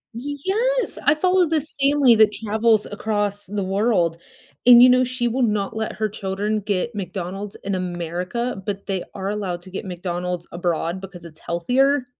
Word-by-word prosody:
Y 285 Hz, +4 st, -4 dB
yes. -, -, 0 dB
I 290 Hz, -, +5 dB
follow 365 Hz, +2 st, +3 dB
this 310 Hz, -1 st, -1 dB
family 275 Hz, -4 st, +5 dB
that 215 Hz, -1 st, +5 dB
travels 220 Hz, 0 st, +1 dB
across 205 Hz, -1 st, -1 dB
the 200 Hz, 0 st, -3 dB
world 190 Hz, -4 st, +1 dB, 0.5 s
and, 245 Hz, -1 st, +9 dB
you 250 Hz, -, +9 dB
know, 255 Hz, 0 st, +5 dB
she 250 Hz, -1 st, -1 dB
will 255 Hz, +3 st, -1 dB
not 210 Hz, -3 st, 0 dB
let 220 Hz, 0 st, -3 dB
her 215 Hz, 0 st, -1 dB
children 205 Hz, +1 st, -2 dB
get 205 Hz, +3 st, -2 dB
McDonald's 195 Hz, +1 st, -5 dB
in 195 Hz, -1 st, -2 dB
America, 180 Hz, +5 st, -3 dB
but 200 Hz, -1 st, -4 dB
they 190 Hz, -2 st, -2 dB
are 195 Hz, 0 st, -4 dB
allowed 190 Hz, -4 st, -3 dB
to 190 Hz, -, -12 dB
get 195 Hz, -, -5 dB
McDonald's 180 Hz, -1 st, -4 dB
abroad 175 Hz, +1 st, -2 dB
because 180 Hz, -3 st, -10 dB
it's 160 Hz, -2 st, -12 dB
healthier. 255 Hz, +10 st, +1 dB
205 Hz, 170 wpm, -22 LUFS, 185-245 Hz, 0.5 s, and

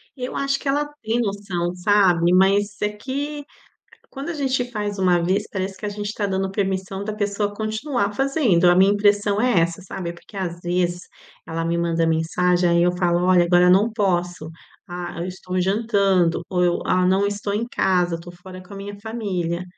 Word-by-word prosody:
Eu 255 Hz, -2 st, -5 dB
acho 275 Hz, 0 st, 0 dB
que -, -, -7 dB
ela 290 Hz, +2 st, +1 dB, 0.2 s
tem 225 Hz, +2 st, 0 dB
noção, 195 Hz, -5 st, -3 dB
sabe? 180 Hz, -2 st, +3 dB
Mas 200 Hz, +2 st, +3 dB
é 210 Hz, -, +1 dB
que 280 Hz, +7 st, -5 dB, 0.7 s
quando 275 Hz, +3 st, -6 dB
a -, -, -2 dB
gente 265 Hz, -4 st, 0 dB
faz 205 Hz, -3 st, -3 dB
uma 180 Hz, -2 st, +3 dB
vez 195 Hz, +4 st, 0 dB
parece 190 Hz, 0 st, -4 dB
que -, -, -7 dB
a -, -, -1 dB
gente 205 Hz, 0 st, -5 dB
tá 210 Hz, -, -2 dB
dando 190 Hz, 0 st, -1 dB
permissão 195 Hz, -1 st, -2 dB
da 215 Hz, +1 st, -4 dB
pessoa 205 Hz, 0 st, -1 dB
continuar 220 Hz, +1 st, -2 dB
fazendo. 265 Hz, -, +2 dB
A 175 Hz, -, +5 dB
minha 190 Hz, +2 st, +5 dB
impressão 205 Hz, 0 st, +2 dB
é 245 Hz, -6 st, +3 dB
essa, 170 Hz, +2 st, -1 dB
sabe? 180 Hz, -1 st, -6 dB
É -, -, -5 dB
porque 170 Hz, +4 st, -17 dB
às 175 Hz, -3 st, -4 dB
vezes 175 Hz, 0 st, -1 dB, 0.4 s
ela 165 Hz, 0 st, -3 dB
me 170 Hz, +1 st, 0 dB
manda 170 Hz, -1 st, +1 dB
mensagem, 175 Hz, +2 st, +1 dB
aí 170 Hz, 0 st, +3 dB
eu 180 Hz, -, +3 dB
falo: 175 Hz, -1 st, +1 dB
"Olha, 180 Hz, -1 st, +5 dB
agora 175 Hz, +1 st, +4 dB
não 200 Hz, +5 st, +4 dB
posso", 180 Hz, -6 st, -1 dB, 0.4 s
"Ah, 175 Hz, 0 st, -6 dB
eu 170 Hz, -, -3 dB
estou 185 Hz, 0 st, -4 dB
jantando", 195 Hz, -3 st, +2 dB
ou 180 Hz, -1 st, +1 dB
eu: 175 Hz, -1 st, +2 dB
"Ah, 185 Hz, 0 st, +2 dB
não 190 Hz, +2 st, +3 dB
estou 205 Hz, 0 st, -3 dB
em 215 Hz, +3 st, -1 dB
casa, 180 Hz, -6 st, +1 dB
tô 175 Hz, +1 st, -10 dB
fora 185 Hz, +1 st, -11 dB
com 185 Hz, +2 st, -13 dB
a -, -, -8 dB
minha 200 Hz, +1 st, -8 dB
família". 185 Hz, -6 st, -3 dB
190 Hz, 195 wpm, -22 LUFS, 175-210 Hz, 0.7 s, A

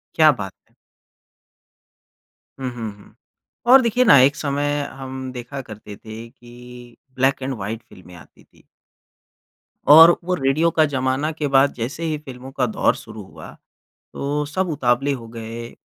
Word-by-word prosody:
क्या 155 Hz, -2 st, +6 dB
बात 105 Hz, -7 st, -6 dB, 0.2 s
है! -, -, -35 dB, 1.9 s
हुँ, 130 Hz, -1 st, -3 dB
हुँ, 110 Hz, -3 st, -5 dB
हुँ। 105 Hz, -, -19 dB, 0.6 s
और 265 Hz, 0 st, +9 dB
देखिए 240 Hz, +1 st, +2 dB
ना 140 Hz, -, +8 dB
एक 135 Hz, +2 st, +4 dB
समय 145 Hz, 0 st, -1 dB
हम 130 Hz, -1 st, -7 dB
देखा 125 Hz, +3 st, -7 dB
करते 105 Hz, -3 st, -11 dB
थे 110 Hz, +1 st, -10 dB
कि 120 Hz, -1 st, -14 dB, 0.2 s
ब्लैक 135 Hz, +1 st, +1 dB
एंड 135 Hz, +1 st, -3 dB
व्हाइट 110 Hz, +3 st, -6 dB
फ़िल्में 90 Hz, -1 st, -15 dB
आती 80 Hz, -, -17 dB
थी। -, -, -27 dB, 1.2 s
और 165 Hz, +3 st, +9 dB
वो 180 Hz, +1 st, -1 dB
रेडियो 145 Hz, +4 st, +1 dB
का 155 Hz, -1 st, +3 dB
ज़माना 135 Hz, +2 st, -1 dB
के 150 Hz, -2 st, -3 dB
बाद 135 Hz, +1 st, +3 dB
जैसे 125 Hz, +8 st, -5 dB
ही 155 Hz, -2 st, -1 dB
फ़िल्मों 130 Hz, -2 st, -11 dB
का 135 Hz, -2 st, 0 dB
दौर 110 Hz, -, +1 dB
शुरू 110 Hz, -2 st, -10 dB
हुआ 95 Hz, -, -12 dB, 0.6 s
तो 145 Hz, +1 st, -2 dB
सब 185 Hz, +4 st, -2 dB
उतावले 135 Hz, -1 st, +1 dB
हो 115 Hz, -3 st, -8 dB
गए, 115 Hz, +1 st, -8 dB
130 Hz, 155 wpm, -21 LUFS, 120-145 Hz, 1.9 s, और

